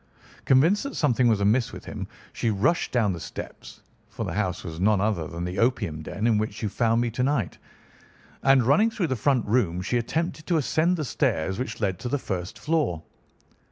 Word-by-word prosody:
"Convinced 160 +10 +4
that 280 - -5
something 130 -4 +2
was 110 -3 +3
amiss 115 +4 +2
with - - -10
him, - - -6 0.3
she 115 - -1
rushed 115 - +1
down 110 -6 +2
the 85 - -6
steps—for - - -9
the - - -4
house - - -2
was 80 0 -7
none 105 +1 +3
other 100 -5 0
than 85 -1 -6
the 90 +1 -3
opium 115 -10 0
den 100 +7 -4
in 110 -3 +3
which 110 +1 -4
you 105 - 0
found 115 +2 +1
me 120 -1 0
to 120 - -3
night—and 135 +1 -1
running 145 - +4
through 220 -5 -2
the 130 - -1
front 125 +1 +1
room 105 -6 +1
she 110 +7 0
attempted 155 +5 -3
to 170 - +2
ascend 155 +5 +1
the 155 - -2
stairs 95 - 0
which 130 - -4
led 95 -5 -1
to 120 - -4
the 145 - +1
first 95 -7 -5
floor. 150 - -1
115 Hz, 195 wpm, -25 LUFS, 100-140 Hz, 0.3 s, Convinced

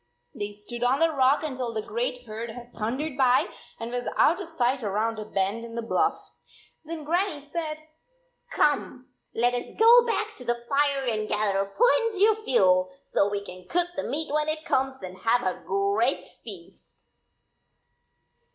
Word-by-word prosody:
They 205 0 -4
stood 210 +4 -6
on 250 +2 +3
the 330 +1 +3
rock 275 +1 +3
until 260 -5 -3
the 215 - -2
great - - -3
herd 225 +2 -6
had 240 +1 -10
thundered 260 +7 -3
by 255 -2 +4 0.3
and 230 +1 -5
was 245 0 -3
out 345 +5 +4
of 350 - -7
sight 260 -4 0
around 220 +2 -1
a 215 - -5
bend 200 +2 -1
in 230 0 -8
the 235 - -3
bluff. 410 - +1 0.6
Then 320 0 -6
Grannie 345 +1 0
said, 310 +1 -5 0.3
" - - -44
Come, 275 -3 0 0.3
let 245 +2 +2
us 245 - -4
go 465 +2 +8
back 435 -1 -1
to 250 - -7
the 240 0 -2
fire 280 -1 +1
and 215 -3 -1
gather 200 -2 +1
plenty 450 - +3
of 435 0 +2
fuel, 185 - +3
so 200 - +1
we 200 0 -3
can 180 -1 -11
cook 350 0 +1
the 285 - -2
meat 295 +3 -2
when 305 0 +1
it 310 +1 -1
comes, 265 -4 0
and 185 0 -8
have 235 +4 +2
a 185 -1 -2
great 200 +6 +1 0.2
feast." 190 -7 -12
250 Hz, 175 wpm, -26 LUFS, 215-315 Hz, 0.6 s, go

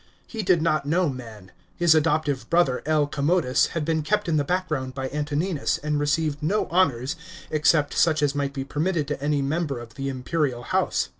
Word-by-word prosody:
He 225 - -5
did 180 -5 +2
not 155 -3 +1
know 170 +2 +2
men. 110 -8 -9 0.3
His 170 -2 +5
adoptive 150 -5 +1
brother 170 -7 +2
L. 155 -2 +3
Commodus 145 -1 +1
had 155 - -1
been 160 0 0
kept 205 +7 0
in 160 -2 +2
the 145 - +2
background 150 -6 -2
by 135 -1 -3
Antoninus, 150 +3 -1
and 150 0 -2
received 145 0 0
no 190 +8 +1
honours 145 -5 +1 0.4
except 150 -1 +2
such 155 -3 +2
as 145 -1 +2
might 140 -1 -1
be 135 -1 -4
permitted 155 +1 -1
to 145 -1 -4
am 145 -2 0
member 155 -3 -1
of 115 -1 -11
the 135 +2 -4
imperial 130 -1 -2
house. - - 0
150 Hz, 190 wpm, -24 LUFS, 140-165 Hz, 0.4 s, His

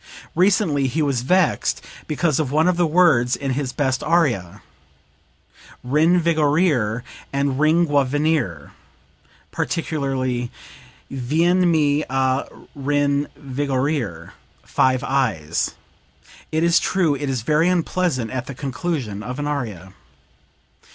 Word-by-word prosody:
Recently 180 -6 +2
he 155 +5 0
was 135 -4 0
vexed 180 +8 +1 0.2
because 155 -1 0
of 145 -4 -1
one 155 +3 +3
of 180 - +3
the 175 -1 +2
words 150 -8 +3
in 135 -2 -3
his 130 0 -2
best 130 -1 -1
aria 145 - 0 1.2
'rinvigorir' 150 - +2 0.3
and 140 -1 -1
'ringiovenir,' 145 - +1 0.8
particularly 130 -6 -2 0.6
'vienmi 155 +2 +2
a 130 +1 +1 0.3
rinvigorir' 140 - -1 0.3
five 130 -1 +1
i's. 110 - -1 0.8
It 160 +1 +1
is 170 0 +4
true 175 -6 +1
it 140 0 -3
is 130 -4 -2
very 155 +7 +2
unpleasant 170 -8 0
at 130 0 -4
the 140 - -7
conclusion 135 - -3
of 125 +4 -6
an 145 - -3
aria." 110 - -4
145 Hz, 105 wpm, -21 LUFS, 130-160 Hz, 1.2 s, is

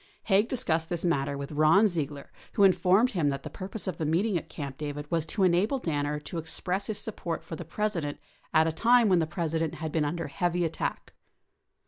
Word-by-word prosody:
Haig 205 +2 +3
discussed 165 -11 0
this 175 0 -2
matter 140 -4 0
with 140 +1 -6
Ron 155 +8 +5
Ziegler 150 -6 -4 0.2
Avho 200 - +6
informed 195 +5 +4
him 165 -9 +1
that 140 -1 -3
the - - -7
purpose 195 +3 -5
of 185 - -4
the 160 - -1
meeeting 185 +6 +1
at 170 - -3
Camp 140 -3 -6
David 145 -1 -4
was 165 -2 0
to 200 - 0
enable 185 +8 +3
Danner 150 - -1
to 165 +3 -5
express 180 +4 -2
his 215 - -2
support 175 -6 -4
for 165 - -7
the - - -6
President 175 -9 -2 0.3
at 160 0 +5
a 165 - +1
time 230 +6 +4
when 180 -2 +4
the 160 - 0
President 160 -1 -2
had 160 -1 -4
been 160 -1 +1
under 165 +3 -2
heavy 175 +4 0
attack. 165 - -4
165 Hz, 205 wpm, -28 LUFS, 150-195 Hz, 0.3 s, Avho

